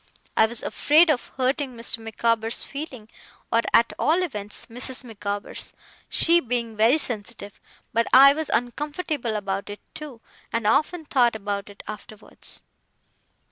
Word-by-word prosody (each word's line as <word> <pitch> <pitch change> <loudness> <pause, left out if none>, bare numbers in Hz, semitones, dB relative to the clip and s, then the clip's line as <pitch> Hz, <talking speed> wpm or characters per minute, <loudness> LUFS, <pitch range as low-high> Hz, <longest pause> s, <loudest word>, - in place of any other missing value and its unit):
I 220 - +5
was 235 +1 -2
afraid 315 +3 +4
of 255 - -1
hurting 260 0 0
Mr. 230 0 0
Micawber's 225 +1 0
feelings, 270 -7 -8 0.4
or, 230 - +4
at 235 - +4
all 340 +4 +3
events, 210 - -3
Mrs. 250 +2 -3
Micawber's, 205 -3 -5 0.4
she 340 +1 +4
being 235 -5 -2
very 225 +7 +4
sensitive; 215 -6 -6 0.3
but 230 +1 +2
I 275 +2 +9
was 315 0 -3
uncomfortable 290 0 -2
about 195 -1 -3
it, 205 - -7
too, 295 -6 -7 0.3
and 230 -1 -1
often 315 +9 +2
thought 245 -5 +3
about 205 -1 -4
it 200 - -12
afterwards. 215 0 -6
235 Hz, 140 wpm, -24 LUFS, 215-280 Hz, 0.4 s, I